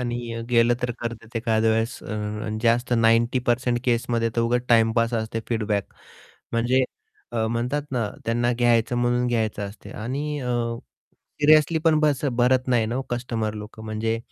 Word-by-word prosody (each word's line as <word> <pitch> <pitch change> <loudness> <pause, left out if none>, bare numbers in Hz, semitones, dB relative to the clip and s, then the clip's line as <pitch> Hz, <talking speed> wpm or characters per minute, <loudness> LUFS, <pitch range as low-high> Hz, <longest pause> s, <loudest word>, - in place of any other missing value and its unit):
आणि 120 -1 -3
गेलं 120 0 +4
तर 125 - 0
करतात, 115 0 -6
एखाद्या 110 -1 +2
वेळेस 115 +2 0
अ, 105 0 -4
जास्त 120 +1 +2
90% 120 +2 +2
केसमध्ये 115 -1 +1
तर - - +3
उगाच 120 +1 +1
टाईमपास 115 0 +3
असते 110 0 -2
फीडबॅक 105 -4 -1 0.6
म्हणजे 120 +3 +2 0.5
अ, 110 -1 0
म्हणतात 120 +5 -1
ना 120 -5 0 0.2
त्यांना 120 +1 +1
घ्यायचं 120 0 +2
म्हणून 120 0 +1
घ्यायचं 110 -3 -1
असते 105 - -13
आणि 145 +4 -3
अ. 125 -2 -2 0.9
सिरियसली 155 +2 +5
पण 160 -2 +4
बस 150 -2 +1
भरत 125 +1 +2
नाही 115 -3 +2
ना 125 +4 -2
कस्टमर 115 -3 -2
लोकं 105 +1 -9
म्हणजे 110 +1 -1
120 Hz, 145 wpm, -24 LUFS, 115-125 Hz, 0.9 s, सिरियसली